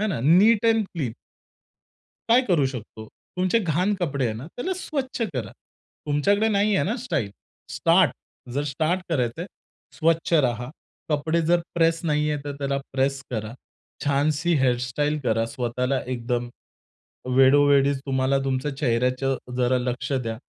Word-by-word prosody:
हे 215 Hz, -, +1 dB
ना. 180 Hz, -, -2 dB
नीट 200 Hz, -, +5 dB
and 225 Hz, -2 st, +3 dB
clean. 135 Hz, -9 st, -2 dB, 1.2 s
काय 235 Hz, +2 st, +6 dB
करू 165 Hz, -6 st, +3 dB
शकतो? 115 Hz, -4 st, -8 dB, 0.3 s
तुमचे 185 Hz, +5 st, +2 dB
घाण 180 Hz, +1 st, 0 dB
कपडे 145 Hz, -8 st, -2 dB
आहेत 110 Hz, -1 st, -3 dB
ना, 125 Hz, -, -8 dB
त्याला 245 Hz, -, -4 dB
स्वच्छ 275 Hz, -9 st, -4 dB
करा. 110 Hz, -6 st, -3 dB, 0.6 s
तुमच्याकडे 200 Hz, +10 st, +2 dB
नाहीये 205 Hz, -1 st, +2 dB
ना 215 Hz, +6 st, -1 dB
स्टाइल, 180 Hz, -, -2 dB, 0.4 s
स्टार्ट. -, -, +3 dB, 0.4 s
जर 145 Hz, -, 0 dB
स्टार्ट 155 Hz, +6 st, 0 dB
करायचंय, 145 Hz, +1 st, -1 dB, 0.5 s
स्वच्छ 165 Hz, +1 st, 0 dB
राहा. 125 Hz, -4 st, +1 dB, 0.4 s
कपडे 160 Hz, +2 st, +1 dB
जर 175 Hz, +1 st, +3 dB
प्रेस 165 Hz, -1 st, +2 dB
नाहीये, 150 Hz, -1 st, +1 dB
तर 145 Hz, -, -4 dB
त्याला 140 Hz, -1 st, -1 dB
प्रेस 135 Hz, 0 st, 0 dB
करा. 110 Hz, -2 st, -4 dB, 0.5 s
छानशी 150 Hz, +4 st, +1 dB
हेयर 125 Hz, -2 st, +3 dB
स्टाइल 145 Hz, +4 st, -1 dB
करा, 115 Hz, -1 st, +1 dB
स्वतःला 125 Hz, +2 st, -1 dB
एकदम 120 Hz, 0 st, -2 dB, 0.9 s
वेळोवेळीच 140 Hz, +1 st, +5 dB
तुम्हाला 135 Hz, 0 st, +1 dB
तुमच्या 135 Hz, +1 st, -2 dB
चेहऱ्याचं 130 Hz, 0 st, 0 dB, 0.2 s
जरा 125 Hz, 0 st, +2 dB
लक्ष 125 Hz, +2 st, -3 dB
द्या. 115 Hz, -4 st, -2 dB
145 Hz, 140 wpm, -24 LUFS, 125-170 Hz, 1.2 s, काय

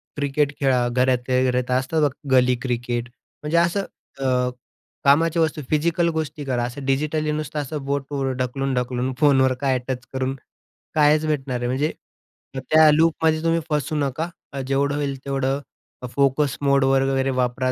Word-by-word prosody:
Cricket 145 Hz, 0 st, 0 dB
खेळा, 130 Hz, -3 st, +2 dB
घरातल्या 125 Hz, +1 st, +1 dB
घरात 125 Hz, 0 st, -1 dB
असतं 155 Hz, +5 st, -1 dB
बघा, 145 Hz, 0 st, -1 dB
गली 125 Hz, 0 st, +4 dB
क्रिकेट 120 Hz, -1 st, -2 dB, 0.3 s
म्हणजे 150 Hz, +3 st, 0 dB
असं 175 Hz, +4 st, +2 dB, 0.3 s
अ, -, -, -4 dB, 0.8 s
कामाची 160 Hz, +4 st, +4 dB
वस्तू 160 Hz, -1 st, 0 dB
फिजिकल 170 Hz, +3 st, +1 dB
गोष्टी 155 Hz, -1 st, -3 dB
करा. 125 Hz, -3 st, -1 dB
असं 130 Hz, +3 st, -5 dB
डिजिटली 150 Hz, +3 st, 0 dB
नुसतं 150 Hz, 0 st, -3 dB
असं 145 Hz, +1 st, -4 dB
बोटवर 140 Hz, -1 st, -2 dB
ढकलून-ढकलून 130 Hz, 0 st, -1 dB
फोनवर 135 Hz, -3 st, +4 dB
काय 135 Hz, -2 st, +2 dB
टच 125 Hz, -1 st, -4 dB
करून 130 Hz, 0 st, -1 dB, 0.6 s
कायच 150 Hz, 0 st, +4 dB
भेटणार 135 Hz, -4 st, -1 dB
आहे? 120 Hz, 0 st, -2 dB
म्हणजे 135 Hz, +5 st, 0 dB, 0.8 s
त्या 155 Hz, 0 st, +7 dB
लूपमध्ये 160 Hz, 0 st, +2 dB
तुम्ही 165 Hz, 0 st, +2 dB
फसू 150 Hz, +1 st, -1 dB
नका 150 Hz, +3 st, -1 dB, 0.4 s
जेवढं 140 Hz, +1 st, +1 dB
होईल 140 Hz, -2 st, -2 dB
तेवढं 135 Hz, 0 st, -1 dB, 0.6 s
फोकस 140 Hz, 0 st, +2 dB
मोडवर 135 Hz, -1 st, +3 dB
वगैरे 135 Hz, 0 st, +1 dB
वापरा. 125 Hz, +1 st, 0 dB
140 Hz, 140 wpm, -22 LUFS, 130-150 Hz, 0.8 s, त्या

